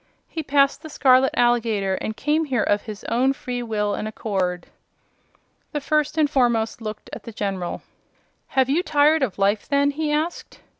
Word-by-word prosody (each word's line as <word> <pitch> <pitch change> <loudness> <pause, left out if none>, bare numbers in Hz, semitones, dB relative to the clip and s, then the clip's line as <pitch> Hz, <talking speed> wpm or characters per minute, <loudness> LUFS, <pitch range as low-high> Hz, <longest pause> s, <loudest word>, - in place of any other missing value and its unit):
"He 325 - -4
passed 280 -1 +2
the 315 - -9
scarlet 265 -2 +4
alligator 225 -5 +2
and 215 +3 -4
came 305 +2 +1
here 255 -7 0
of 205 0 +1
his 210 -2 -9
own 260 +3 +1
free 250 -2 -5
will 210 -3 -1
and 215 - -3
accord." 190 -5 -2 1.1
The 295 - 0
First 300 +2 0
and 310 -2 +4
Foremost 240 -5 +1
looked 215 -1 -7
at - - -6
the 230 - -9
General. 195 -4 -4 0.7
"Have 260 -1 +5
you 290 +6 +2
tired 305 -1 +3
of 240 -9 -1
life, 200 +1 +1
then?" 285 0 +3
he 300 +1 -2
asked. 310 +3 -3
245 Hz, 170 wpm, -23 LUFS, 215-290 Hz, 1.1 s, Have